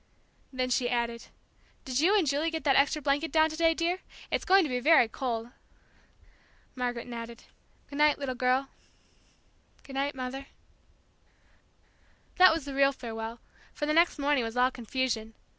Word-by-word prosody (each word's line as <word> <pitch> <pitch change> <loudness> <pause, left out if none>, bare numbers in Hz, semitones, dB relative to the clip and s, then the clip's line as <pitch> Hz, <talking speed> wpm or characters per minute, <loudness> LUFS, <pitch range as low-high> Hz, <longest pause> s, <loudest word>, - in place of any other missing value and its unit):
'" - - -38
Then 255 -1 -2
she 245 0 +1
added, 235 -1 -2 0.6
"Did 260 -1 -1
you 380 +7 +4
and 380 - +2
Julie 290 +3 0
get 320 -1 -4
that 275 -3 +3
extra 285 +2 +2
blanket 285 +4 0
down 315 0 +3
to - - -6
day, 330 0 +2
dear? 345 +2 -1 0.3
it's - - -1
going 385 +1 +5
to 305 - -3
be 250 -1 -1
very 290 -2 +5
cold." 235 -1 -4 1.2
Margaret 245 -2 -3
nodded. 235 -1 -8 0.4
"Good 285 - -8
night, 300 -1 +4
little 275 -3 -3
girl 255 +2 0 0.6
" - - -36
"Goodnight, 275 +1 -3
Mother 265 +1 -6 0.9
" - - -36
That 370 0 +9
was 320 -3 -2
the 280 - -6
real 275 0 +3
farewell, 225 -2 -7 0.3
for 295 - -2
the 305 - 0
next 335 +2 +3
morning 285 -3 +1
was 225 +1 -5
all 250 +1 +3
confusion. 235 -2 -3
270 Hz, 170 wpm, -28 LUFS, 245-300 Hz, 1.2 s, That